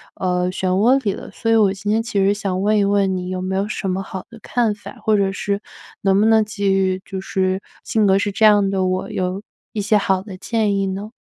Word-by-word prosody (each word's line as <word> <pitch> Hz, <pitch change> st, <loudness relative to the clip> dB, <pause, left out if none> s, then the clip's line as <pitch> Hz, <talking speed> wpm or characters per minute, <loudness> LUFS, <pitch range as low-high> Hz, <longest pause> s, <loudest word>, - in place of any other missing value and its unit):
呃， 180 Hz, -1 st, 0 dB
漩 190 Hz, -, -2 dB
涡 230 Hz, +9 st, +3 dB
里 200 Hz, -, +1 dB
了。 -, -, -9 dB
所 225 Hz, -, -2 dB
以 -, -, +5 dB
我 200 Hz, -3 st, +4 dB
今 205 Hz, +1 st, -3 dB
天 225 Hz, +1 st, +2 dB
其 220 Hz, -3 st, -4 dB
实 200 Hz, +1 st, +3 dB
想 195 Hz, -2 st, -2 dB
问 210 Hz, +1 st, +2 dB
一 -, -, +3 dB
问 200 Hz, -2 st, +1 dB
你 180 Hz, 0 st, -5 dB
有 185 Hz, 0 st, -3 dB
没 190 Hz, +1 st, -2 dB
有 200 Hz, +1 st, 0 dB
什 195 Hz, -2 st, -3 dB
么 190 Hz, +1 st, -1 dB
好 190 Hz, -1 st, -7 dB
的 230 Hz, -1 st, -13 dB
看 235 Hz, -4 st, 0 dB
法， 205 Hz, -, -11 dB
或 215 Hz, -1 st, +3 dB
者 195 Hz, -1 st, +1 dB
是 200 Hz, +1 st, -2 dB, 0.4 s
能 195 Hz, 0 st, +3 dB
不 210 Hz, -, +4 dB
能 220 Hz, -1 st, +5 dB
给 200 Hz, -2 st, -1 dB
予 190 Hz, -1 st, +1 dB
就 190 Hz, -, -5 dB
是 190 Hz, 0 st, -1 dB, 0.2 s
性 215 Hz, -2 st, +1 dB
格 190 Hz, 0 st, +4 dB
是 205 Hz, 0 st, -1 dB
这 215 Hz, +2 st, +2 dB
样 205 Hz, -2 st, +5 dB
的 190 Hz, -1 st, 0 dB
我， 185 Hz, 0 st, -2 dB
有， 185 Hz, +2 st, -2 dB, 0.3 s
一 210 Hz, -, -2 dB
些 210 Hz, +1 st, +3 dB
好 190 Hz, -2 st, +1 dB
的 195 Hz, -3 st, -9 dB
建 215 Hz, -1 st, 0 dB
议 195 Hz, 0 st, 0 dB
呢？ 200 Hz, +3 st, -5 dB
195 Hz, 270 characters per minute, -20 LUFS, 190-210 Hz, 0.4 s, 以